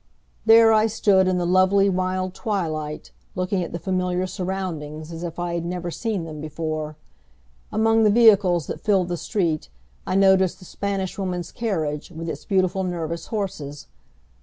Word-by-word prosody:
There 225 0 +8
I 215 0 +4
stood 200 -3 +3
in 185 -1 +2
the 175 - 0
lovely, 185 +2 +4
mild 185 0 -1
twilight, 160 -8 -3 0.2
looking 185 +1 -1
at 170 - -6
the - - -3
familiar 180 +1 -1
surroundings 175 -5 -4
as 165 0 -7
if 170 -1 -5
I 175 -1 -2
had 170 -1 -2
never 175 0 -4
seen 215 -2 -2
them 155 -2 -7
before. 155 0 -4 0.7
Among 225 +1 +3
the 215 - +5
vehicles 200 - +5
that - - -6
filled 190 -4 +2
the 175 - -1
street 165 - -1 0.4
I - - 0
noticed 190 -2 +4
the 185 - -14
Spanish 195 0 -3
Woman's 180 -3 -3
carriage, 155 -10 -2
with 165 -1 -7
its - - -6
beautiful 190 -1 +1
nervous 170 -2 -4
horses. 155 -9 -5
185 Hz, 160 wpm, -23 LUFS, 165-195 Hz, 0.7 s, There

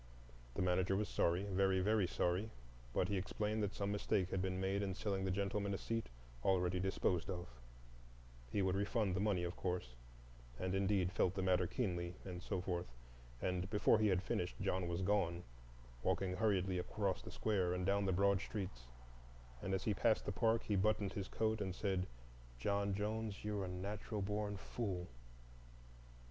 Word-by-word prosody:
The - - +1
manager 90 +1 +2
was 105 +1 0
sorry, 85 +3 +2
very, 95 -1 +2
very 105 0 +3
sorry,—but - - -2
he 100 - 0
explained 105 +3 -1
that 100 -1 -1
some 100 0 -1
mistake 100 -2 +1
had 95 - +1
been 95 0 -1
made 95 +1 +1
in 95 -2 -1
selling 95 -2 -1
the - - +1
gentleman 100 +1 0
a - - -2
seat 115 +2 -2 0.3
already 90 -1 +2
disposed 95 -2 +1
of; 90 -2 -3 1.1
he 100 - +2
would 95 -1 +2
refund 100 -1 +1
the - - 0
money, 100 -3 +2
of 85 +1 -3
course,—and - - -5
indeed 95 -1 +2
felt 90 0 +2
the 95 - 0
matter 90 -1 +3
keenly, 90 -7 -1
and 90 -2 -5
so 95 - -2
forth, 90 -3 -2 0.6
and—before 95 +4 +3
he 110 - +4
had 95 -1 +2
finished 90 -1 -2
John 95 -2 0
was 85 +2 -1
gone, 90 -3 +1 0.6
walking 90 +6 +1
hurriedly 95 -3 +2
across 95 +1 -1
the - - -8
square 95 -5 +1
and 90 0 -1
down 100 +1 +2
the 95 - +2
broad 100 +1 +3
streets, 95 - -5 0.8
and 95 - -3
as 95 -1 0
he 105 - +2
passed 110 +3 +2
the - - -1
park 115 +2 +2
he 105 - 0
buttoned 100 0 +2
his 100 -2 -3
coat 110 -1 0
and 95 -2 -2
said, 95 -3 0 0.5
"John 100 +7 +1
Jones, 105 0 -2
you're 105 -2 -1
a - - -4
natural 100 +3 -3
born 105 0 -1
fool." 95 -4 -3
95 Hz, 170 wpm, -39 LUFS, 90-100 Hz, 1.1 s, he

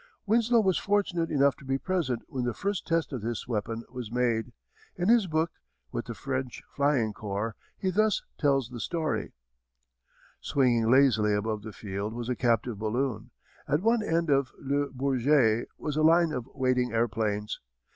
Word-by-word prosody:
Winslow 230 +2 +4
was 190 -3 +2
fortunate 190 -5 0
enough 140 -1 +3
to - - -15
be 135 0 0
present 150 -8 -1
when 130 -2 -3
the 120 -1 -1
first 200 -1 -2
test 165 -3 0
of 125 - -3
this 115 +1 -4
weapon 115 0 -2
was 125 -4 -6
made. 120 -1 0 0.4
In 180 +3 0
his 230 -4 +5
book, 160 0 0 0.4
With - - -3
the - - -6
French 130 -2 -4
Flying 140 -7 +2
Corps, 105 +1 -3 0.2
he 190 - -1
thus 215 +2 +2 0.2
tells 135 -5 +2
the 125 -2 -7
story: 160 +7 -2 1.1
Swinging 120 -5 +2
lazily 115 -6 +4
above 105 +1 -2
the 110 +1 -8
field 105 +1 -5
was 120 0 -4
a 125 - 0
captive 120 -2 0
balloon. 110 +1 -2 0.4
At 150 +5 +1
one 230 +1 +3
end 165 -5 0
of 135 -1 +2
Le 140 +1 0
Bourget 130 -3 +2
was 150 -2 -3
a - - +2
line 165 +1 +5
of 125 -3 -4
waiting 130 -2 +1
airplanes. 110 -2 -1
130 Hz, 165 wpm, -28 LUFS, 115-160 Hz, 1.1 s, his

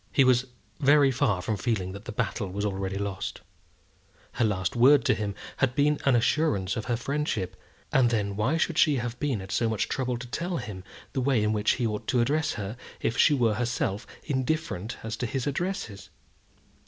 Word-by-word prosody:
He 135 - +5
was 130 0 +3 0.3
very 145 -1 +5
far 115 -8 +1
from 110 0 -1
feeling 95 -3 -1
that 100 +3 -9
the - - -5
battle 105 -2 -2
was 100 +3 -3
already 95 -1 -2
lost. 100 -1 -4 0.9
Her - - 0
last 95 -3 0
word 130 +2 +6
to - - +4
him 105 -1 -3 0.2
had 130 -2 +1
been 150 +1 +3
an 135 -3 +5
assurance 115 - +1
of 110 - -3
her 120 -2 0
friendship; 130 -7 -2 0.4
and 125 -3 +5
then 105 -4 -1
why 125 +10 +1
should 165 0 0
she 150 -3 +5
have 120 -1 -3
been 135 -9 -1
at 95 - -9
so 115 - +1
much 110 -2 0
trouble 125 -2 -1
to 120 - -7
tell 170 +8 -3
him 95 -8 -6 0.3
the 135 - 0
way 125 -4 +2
in 105 0 +2
which 105 0 +2
he 125 - -1
ought 105 -1 -3
to 125 - +2
address 145 +6 +1
her 105 +3 -5 0.2
if 115 - -1
she 150 - +5
were 115 -5 +2
herself 115 -3 -2 0.2
indifferent 130 - -2
as 110 0 -3
to 125 - -2
his 130 +2 -2
addresses? 140 - -3
120 Hz, 200 wpm, -27 LUFS, 105-135 Hz, 0.9 s, word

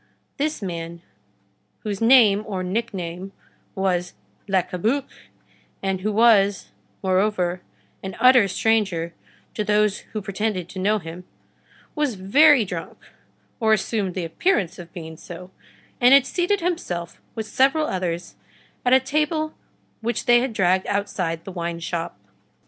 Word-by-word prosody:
This 300 -6 -2
man, 170 -2 -6 0.8
whose 205 -1 -4
name 225 -4 +6
or 190 -3 -3
nickname 190 -2 -4 0.4
was 180 -2 -1 0.3
Le 190 -2 +2
Cabuc, 225 +12 -1 0.8
and 190 -1 -1
who 215 +3 -1
was, 205 -3 +3 0.3
moreover, 185 -2 +1 0.4
an 190 -1 -7
utter 250 -3 +6
stranger 190 -5 0 0.4
to 210 - -2
those 210 -1 +2
who 215 - -3
pretended 195 -2 -2
to 190 - -7
know 210 +3 +2
him, 175 -1 -9 0.7
was 295 -7 -1
very 255 +7 +5
drunk, 175 -3 -6 0.6
or 220 -2 +3
assumed 205 -3 -1
the 180 -3 -2
appearance 190 - 0
of 170 -1 -10
being 160 -2 -8
so, 180 +3 -10 0.5
and 250 +2 +8
had 275 -1 +5
seated 365 +2 0
himself 185 - -3
with 220 - -3
several 275 +7 +2
others 175 - -3 0.5
at 250 - +3
a 260 - +8
table 305 +4 -1 0.5
which 235 +1 -2
they 240 0 +6
had 255 +1 -1
dragged 185 -3 +1
outside 195 -4 -1
of 165 - -26
the 195 - -6
wine 170 -2 -4
shop. 170 - -4
200 Hz, 140 wpm, -23 LUFS, 180-235 Hz, 0.8 s, and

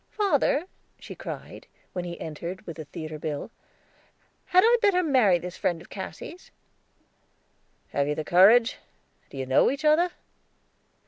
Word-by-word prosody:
"Father," 340 -6 +1 0.3
she - - -10
cried, - - -8 0.3
as 180 - -2
he 175 -1 -7
entered 170 +4 -6
with 170 -1 -8
a 155 - -6
theater 155 +1 -7
bill, 150 +7 -4 0.9
"had 370 0 +4
I 475 +1 +5
better 390 -4 +3
marry 250 - +4
this 180 +1 -8
friend 170 -2 -1
of - - -16
Cassy's?" 300 - -8 1.4
"Have 140 0 0
you 150 - -1
the 155 - -3
courage? 220 +9 +5 0.5
Do - - -11
you 130 - -3
know 130 +1 +4
each 280 +3 -4
other?" 320 +4 +4
185 Hz, 145 wpm, -26 LUFS, -, 1.4 s, I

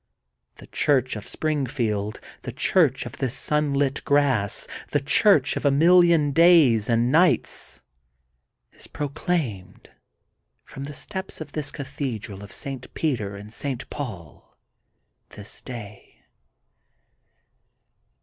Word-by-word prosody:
The - - -13
Church 130 -4 +1
of 105 - -8
Spring 150 -4 -1
field, 110 -4 -2 0.2
the 125 - -6
church 135 0 +2
of 120 - -9
this 130 -2 -1
sunlit 145 -2 0
grass, 135 -9 +1 0.2
the 145 - +1
church 145 +1 +3
of - - -4
a 145 - +4
million 165 0 +5
days 155 -10 +5
and 120 +1 +2
nights, 170 +4 +1 0.9
is - - -11
pro 145 -1 -4
claimed 130 - -3 0.7
from 135 - -8
the 145 0 -8
steps 190 +3 -6
of 155 -2 -8
this 150 -2 -3
Cathedral 120 -8 -5
of 100 - -11
St. 135 -2 -6
Peter 115 -11 -1
and 105 +2 -11
St. 135 -1 -4
Paul 100 - -8 0.8
this 105 0 -10
day.' 105 -5 -10
135 Hz, 120 wpm, -24 LUFS, 115-150 Hz, 0.9 s, million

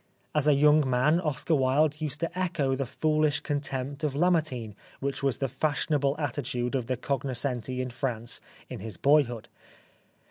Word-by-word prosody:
As 150 -1 +2
a 150 - +6
young 150 0 +5
man 130 +7 +3
Oscar 160 -1 -1
Wilde 145 +2 +2
used 150 -1 -3
to 165 0 -2
echo 170 -7 0
the 135 -1 -2
foolish 155 +2 +1
contempt 140 0 -3
of 145 -3 0
Lamartine 155 - +1 0.3
which 140 +1 -3
was 135 -3 +1
the 135 - -1
fashionable 145 +1 0
attitude 125 -4 -2
of 125 -4 -1
the 130 -1 -1
cognoscenti 130 -1 -2
in 130 -1 -4
France 120 -2 -1 0.3
in 125 - -7
his 110 +2 -7
boyhood. 135 -5 +2
140 Hz, 155 wpm, -28 LUFS, 130-150 Hz, 0.3 s, a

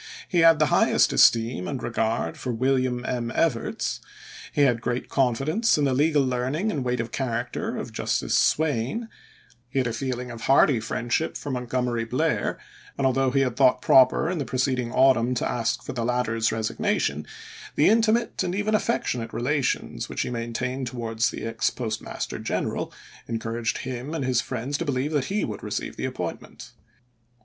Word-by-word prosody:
He 175 - +1
had 165 -1 +7
the - - +3
highest - - +4
esteem 115 -5 +4
and 130 -3 -4
regard 115 0 -1
for 125 - -4
William 130 0 0
M. 120 -2 -2
Evarts; 140 -9 0 0.5
he 145 - 0
had 125 -5 +3
great 125 +1 -2
confi 130 -1 +1
dence 215 +8 +2
in 150 - +1
the 135 - +2
legal 145 +1 +3
learning 130 - -1
and 140 -8 -2
weight 125 -1 -1
of 115 0 -3
character 120 -2 -3
of - - -6
Justice - - -1
Swayne; 155 - +1 0.6
he 135 - -5
had 130 - +2
a 115 - -1
feeling 125 0 -3
of 115 -1 -8
hearty 135 0 +4
friend 120 +2 -3
ship 160 - 0
for 145 - -5
Montgomery 125 -1 -1
Blair, 150 +7 0 0.4
and 140 - 0
although 130 0 +2
he 135 +1 +2
had 125 -3 0
thought 125 -1 +4
proper 130 +4 +5
in 175 -1 -1
the - - 0
preceding 125 -1 -1
autumn 125 -2 +4
to - - 0
ask 115 -2 -1
for - - -6
the 120 -2 -2
latter's 115 -2 0
resignation, 110 -9 -1 0.5
the 150 - +4
intimate 225 +2 +2
and 185 -1 -1
even 210 +2 0
affec 230 +2 +1
tionate 115 -2 -3
relations 130 - -1
which - - -3
he - - -4
maintained 125 +2 -3
towards 115 -1 -1
the - - -6
ex 115 0 0
Postmaster 110 -4 -4
General - - -2 0.4
encouraged 115 +1 -2
him 130 +4 -5
and 140 - -2
his 125 -2 +2
friends 130 +3 -3
to - - -2
believe 140 +1 -1
that 145 -4 0
he 200 +6 -1
would 105 - -6
receive - - -4
the - - -3
appointment. - - -6
125 Hz, 180 wpm, -25 LUFS, 115-140 Hz, 0.6 s, had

